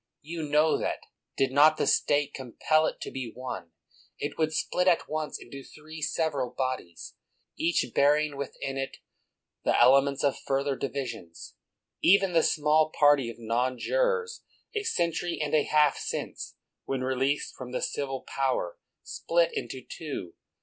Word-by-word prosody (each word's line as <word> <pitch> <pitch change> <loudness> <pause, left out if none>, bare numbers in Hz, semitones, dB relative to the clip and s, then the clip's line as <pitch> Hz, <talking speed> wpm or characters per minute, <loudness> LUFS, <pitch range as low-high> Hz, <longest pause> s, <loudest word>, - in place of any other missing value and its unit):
You 165 +2 -5
know 150 +2 +3
that, - - -2 0.4
did 135 -1 +2
not 150 +3 +6
the - - +1
State 145 0 +2
compel 155 +5 +1
it - - -4
to - - -5
be 130 -4 -5
one, 125 -9 -6 0.5
it 145 - -4
would 155 -1 0
split 180 +3 0
at 175 -2 +3
once 155 0 -3
into 135 +3 -10
three 155 +2 -11
several 145 -5 -1
bodies, 130 -11 -4 0.4
each 170 -3 +1
bearing 150 +1 +3
within 135 -1 -5
it 135 - -4 0.7
the - - +2
elements 135 +3 +5
of 140 -2 +1
further 140 0 -1
divisions. 130 -12 -6 0.5
Even 195 0 +5
the 165 - +5
small 155 0 +3
party 145 -5 +4
of 115 - -8
non 120 +3 -1
jurors, 475 - 0 0.3
a 425 - -1
century 170 - -1
and 150 -1 -2
a 150 -2 +4
half 150 -2 +3
since, - - -5 0.3
when 135 -1 -2
released 130 +2 0
from 125 -1 -8
the 125 - -2
civil 135 -2 -3
power, 130 -10 -2 0.2
split 170 0 +1
into 130 -2 -5
two. 140 - -6
145 Hz, 150 wpm, -28 LUFS, 130-155 Hz, 0.7 s, not